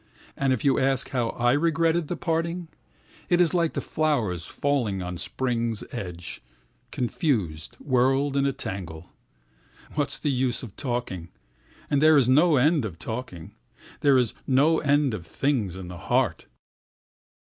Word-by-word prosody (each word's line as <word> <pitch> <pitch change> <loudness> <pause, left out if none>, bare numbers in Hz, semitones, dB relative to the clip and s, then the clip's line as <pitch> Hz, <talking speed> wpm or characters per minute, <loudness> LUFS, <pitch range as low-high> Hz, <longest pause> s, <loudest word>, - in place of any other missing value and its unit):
And 135 -1 +1
if 130 0 -1
you 135 - +4
ask 135 -1 +1
how 120 -3 0
I 120 0 +1
regret 165 +2 +2
that 175 - -2
parting? 165 +1 -2 0.6
It 175 - +3
is 175 -1 +4
like 170 -2 +1
the - - -2
flowers 120 - -1
falling 125 -9 -1
at 90 -1 -5
spring's 115 -3 -2
end, 90 -2 -6 0.5
confused, 110 - -2
whirled 135 +1 +2
in 140 0 +2
a - - +2
tangle. 95 - -6 0.8
What 145 -2 0
is - - +2
the 145 - -1
use 125 -2 0
of 110 -6 -9
talking! 120 - -4 0.6
And 145 -1 +1
there 155 0 +6
is 130 -4 +4
no 150 +5 +5
end 150 +2 +3
of 95 -7 -5
talking—There 115 - -3
is 125 -4 +1
no 145 +5 +4
end 145 -3 +2
of 85 -6 -6
things 120 -10 -1
in 95 -1 -7
the 90 0 -8
heart. - - 0
130 Hz, 150 wpm, -26 LUFS, 105-150 Hz, 0.8 s, there